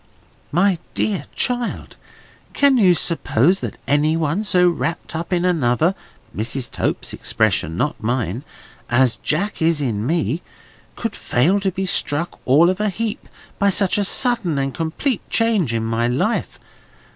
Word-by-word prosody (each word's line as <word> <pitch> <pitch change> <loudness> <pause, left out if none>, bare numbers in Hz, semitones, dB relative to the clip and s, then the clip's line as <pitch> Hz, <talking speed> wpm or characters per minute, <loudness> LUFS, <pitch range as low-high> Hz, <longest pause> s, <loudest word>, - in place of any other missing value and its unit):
"My 180 +2 +2 0.2
dear 205 -3 -1
child! 245 -2 -2 0.6
can 280 -3 +4
you 185 -5 +5
suppose 170 +1 +2
that - - -5
any 150 +3 +2
one 165 +6 0
so 180 -3 +3
wrapped 170 -1 -2
up 165 +3 -4
in 180 0 +1
another—Mrs. 130 - -1
Tope's - - -2
expression: 80 +2 0
not 150 - -1
mine—as 120 - -2
Jack 195 +7 -2
is 160 -1 +2
in 115 -5 -2
me, 165 +1 0 0.5
could 230 -3 -4
fail 170 +12 +2
to 195 -1 0
be 190 +2 -3
struck 170 -3 0
all 155 +7 +5
of 185 - -5
a 210 - +1
heap 215 +2 -4 0.3
by 200 - +4
such 195 +1 +2
a - - +2
sudden 210 - +1
and 135 -1 -1
complete 175 - -2
change 220 - +2
in 115 -1 -1
my 115 +1 0
life? 125 +1 -1
170 Hz, 145 wpm, -20 LUFS, 135-195 Hz, 0.6 s, you